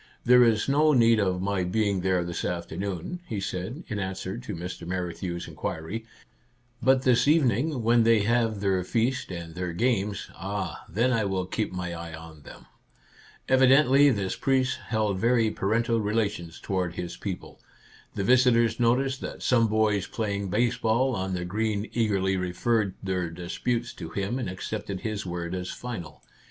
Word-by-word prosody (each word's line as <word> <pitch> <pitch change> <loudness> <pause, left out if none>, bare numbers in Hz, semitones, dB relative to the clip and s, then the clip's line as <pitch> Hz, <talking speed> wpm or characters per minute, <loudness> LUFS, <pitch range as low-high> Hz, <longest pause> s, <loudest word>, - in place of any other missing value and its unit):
" - - -36
There 125 0 +7
is 115 -2 +2
no 150 +2 +4
need 115 -3 +5
of 95 -2 0
my 100 -2 0
being 100 +1 0
there 90 -1 +1
this 85 0 -4
afternoon," 90 - -4
he 105 - -3
said, 95 - -4
in 105 - -3
answer 95 0 -4
to 125 -4 -6
Mr. 85 0 -6
Men 90 -1 -2
knew' 90 -2 -2
s 85 - -6
inquiry; 100 +9 -5 0.4
" 120 0 -38
but 130 +2 +4
this 125 +1 +3
evening, 140 -2 +2
when 115 +1 +4
they 115 -1 +4
have 115 -1 +1
their 95 -2 +1
feast 120 +7 0
and 85 -2 -6
their 90 0 -4
games, 105 -1 0
— - - -19
ah, 100 0 -4
then 120 +8 +1
I 110 -3 +1
will 95 -2 -1
keep 110 +4 -2
my 90 -1 -4
eye 85 -1 -7
on 80 -1 -12
them! - - -13 0.4
" - - -29 0.3
Evidently 135 +2 +6
this 100 -7 -1
priest 135 -1 +1
held 105 -4 0
very 115 0 +3
parental 115 +3 +1
relations 105 -6 -2
toward 90 -3 -2
his 90 -1 -5
people. 95 -3 -6 0.6
The 100 - -1
visitors 120 0 +4
noticed 130 +3 +2
that - - -6
some 115 -3 +4
boys 105 -3 +1
playing 100 -3 -2
baseball 120 +3 +1
on 95 0 -2
the 90 -1 -3
green 105 +2 -1
eagerly 100 -4 +1
referred 95 +3 0
their 90 -3 -1
disputes 115 +8 -3
to 80 - -5
him 100 +8 -2
and 120 - -3
accepted 95 +1 -5
his 105 -3 -3
word 85 0 -4
as 90 -1 -4
final. 110 -11 -7
105 Hz, 175 wpm, -27 LUFS, 90-120 Hz, 0.6 s, There